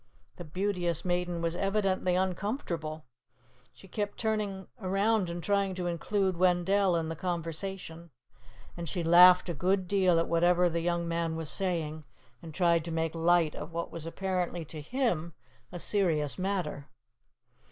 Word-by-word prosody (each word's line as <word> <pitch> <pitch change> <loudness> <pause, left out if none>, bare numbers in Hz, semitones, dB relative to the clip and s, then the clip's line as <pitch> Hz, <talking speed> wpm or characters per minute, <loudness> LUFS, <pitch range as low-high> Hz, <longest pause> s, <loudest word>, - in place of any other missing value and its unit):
The 175 - -7
Beauteous 175 0 -2
Maiden 175 -1 -1
was 165 0 -1
evidently 195 -2 0
uncomfortable. 180 - -2 0.7
She 195 - -16
kept 205 +1 -3
turning 210 -4 -2
around 195 0 +1
and 170 0 -5
trying 200 -2 +1
to 180 -1 -3
include 185 +2 0
Wendell 185 +1 +3
in 165 -1 -1
the 165 - -4
conversation, 170 0 -5 0.7
and 170 -2 -5
she 175 - -2
laughed 180 +2 +7
a 175 - -2
good 185 +4 0
deal 185 -3 +3
at 165 - +1
whatever 175 +1 +3
the 170 0 -2
young 170 0 -1
man 165 -1 -1
was 160 -2 -4
saying, 165 -5 -2 0.4
and 165 - -9
tried 170 0 +2
to 170 - -5
make 160 -1 -1
light 165 -1 +3
of 155 +3 -8
what 170 0 -3
was 165 -1 -6
apparently 180 -1 -2
to 155 +1 -8
him 170 - -1 0.4
a 175 - -6
serious 165 -7 +1
matter. 185 -7 -2
175 Hz, 150 wpm, -30 LUFS, 165-190 Hz, 0.7 s, laughed